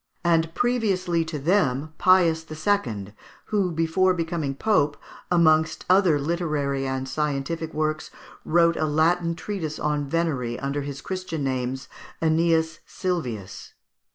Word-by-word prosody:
and, 165 -1 +2
previously 195 -9 +1
to 160 -1 -5
them, 155 -2 +1
Pius 175 -3 +4
II, 155 - -1 0.4
who, 195 -4 +2
before 165 +3 +2
becoming 165 -5 -2
Pope, 150 -5 +1 0.3
amongst 160 -2 +3
other 185 -5 +5
literary 145 -4 -1
and 130 0 -3
scientific 150 +3 -2
works, 155 0 -2 0.3
wrote 170 0 +3
a 155 - +1
Latin 165 +3 +2
treatise 165 -4 -4
on 150 -1 -1
venery 140 -8 -1
under 140 +2 -2
his 140 0 -6
Christian 185 -5 -4
names, 130 0 -2 0.3
Æneas 160 0 +2
Silvius. 125 - -4
160 Hz, 120 wpm, -24 LUFS, 145-175 Hz, 0.4 s, other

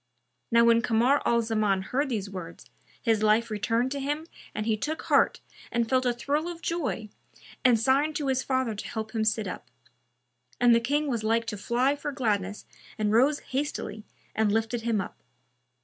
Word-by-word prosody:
Now 235 0 +5
when 230 0 +5
Kamar 245 +5 +3
al 235 -1 +3
Zaman 215 -4 +1
heard 270 +8 -1
these 210 -5 -2
words, 180 -4 -8 0.3
his 225 -3 +1
life 215 +2 +3
returned 230 +4 0
to 280 - -2
him 295 +3 -2 0.3
and 215 - -2
he 220 -1 +2
took 300 +9 -4
heart - - +3 0.3
and 235 -1 +1
felt 255 +1 +2
a 245 - +2
thrill 290 +6 -1
of 345 -1 -7
joy 280 -10 -2 0.5
and 245 -3 +5
signed 275 +6 +2
to 295 - -2
his 265 -1 +1
father 260 -4 0
to 205 - -6
help 220 -1 -5
him 220 -1 0
sit 220 -1 0
up; 150 -8 -7 0.9
and 240 -1 +6
the 230 - +5
King 290 +6 0
was 235 -5 -1
like 230 +1 +1
to 210 - -4
fly 245 +7 +1
for 290 0 -4
gladness 210 -7 -1 0.3
and 210 -1 0
rose 270 +7 +3
hastily 260 -6 -4 0.3
and 220 -1 +2
lifted 225 +2 0
him 225 -2 0
up. 190 - -6
235 Hz, 185 wpm, -27 LUFS, 215-270 Hz, 0.9 s, and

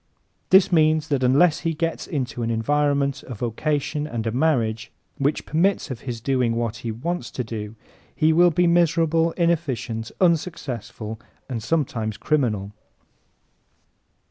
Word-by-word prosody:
This 190 0 +6
means 155 -1 +3
that 140 -3 +1
unless 145 +6 +4
he 165 -2 -2
gets 165 +1 -2
into 130 -4 -3
an 115 - -1
environment, 140 +4 +1
a 125 - -6
vocation 145 +6 -2
and 115 -6 -4
a 115 - 0
marriage 120 -5 0 0.3
which 140 +2 0
permits 170 -1 +1
of 125 - -5
his 120 -3 -5
doing 125 -2 0
what 115 -1 -2
he 115 -1 -4
wants 170 +11 -3
to 125 - -4
do 110 -1 -6 0.4
he 160 0 +3
will 175 +2 +6
be 175 +2 +2
miserable, 165 -1 +3
inefficient, 135 - -1
unsuccessful 125 - -1 0.3
and 120 -4 -4
sometimes 115 -6 -1
criminal. 110 -8 0
140 Hz, 140 wpm, -23 LUFS, 115-160 Hz, 0.4 s, This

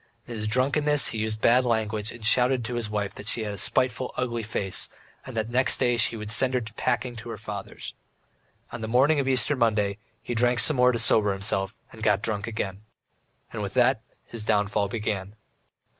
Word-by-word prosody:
In 120 - -8
his 105 -1 -4
drunkenness 140 +5 +2
he 110 - -4
used 110 0 -2
bad 125 +2 +4
language 110 -2 -1
and 120 -2 -9
shouted 125 +1 +4
to 120 - -4
his 120 -3 -3
wife 105 -1 -3
that 100 - -11
she 110 +1 +1
had 105 -1 -4
a - - -7
spiteful, 130 +4 0
ugly 120 -2 -2
face, 105 -3 -2 0.4
and 130 -3 -7
that 110 +1 -2
next 130 +2 +3
day 120 -1 +2
he 115 0 +2
would 105 -1 -5
send 130 +3 +3
her 125 - +1
packing 125 +1 -1
to 115 +1 -9
her 115 - -6
father's. 105 -2 -7 0.8
On 120 - -7
the 110 - -4
morning 135 +6 +3
of 135 - -1
Easter 135 +2 +4
Monday, 105 -5 0 0.2
he - - -4
drank 120 +1 +2
some 150 +3 +5
more 125 0 +5
to 120 - -2
sober 110 -3 +3
himself, 95 +2 -2
and 110 - -13
got 105 -2 +2
drunk 105 -1 -2
again. 100 -3 -4 0.7
And 110 - -4
with 100 +1 -5
that 125 -2 +3 0.2
his 115 -2 -7
downfall 105 -1 +1
began. 100 -1 -4
115 Hz, 205 wpm, -25 LUFS, 105-125 Hz, 0.8 s, some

